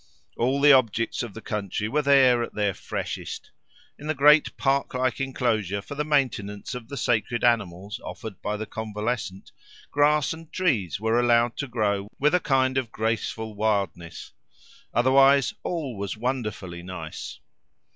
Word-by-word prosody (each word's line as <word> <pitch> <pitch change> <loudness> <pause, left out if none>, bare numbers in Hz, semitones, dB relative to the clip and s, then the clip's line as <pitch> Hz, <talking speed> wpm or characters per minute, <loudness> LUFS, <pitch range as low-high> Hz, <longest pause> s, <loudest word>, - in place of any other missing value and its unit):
All 130 +4 +1
the 145 0 +7
objects 115 -3 +2
of 115 -4 -6
the 115 - -9
country 105 0 -3
were 150 +7 +1
there 135 -4 +5
at 115 - -5
their 105 -2 +1
freshest. - - -6 0.5
In 150 - -8
the 155 - 0
great 150 +2 +5
park 135 -1 0
like 130 0 0
enclosure 110 -7 -1
for 110 - -8
the 145 +1 -2
maintenance 125 -9 -1
of 125 -2 -7
the 140 - -7
sacred 120 0 0
animals 100 -4 0
offered 110 -6 -8
by 105 0 -2
the 110 - -4
convalescent, 110 -2 -4 0.4
grass 150 +1 +3
and 160 -1 -12
trees 115 - 0
were 110 +2 +2
allowed 120 -1 +3
to 140 - -3
grow 105 -4 -1
with 150 +3 +3
a 180 - +4
kind 130 -4 +2
of 120 -4 -6
graceful 110 0 -2
wildness; 100 -6 -2 0.6
otherwise, 135 +2 +4
all 155 -9 -3
was 100 0 -4
wonderfully 110 -8 -3
nice. 85 -3 -7
120 Hz, 155 wpm, -25 LUFS, 105-135 Hz, 0.6 s, the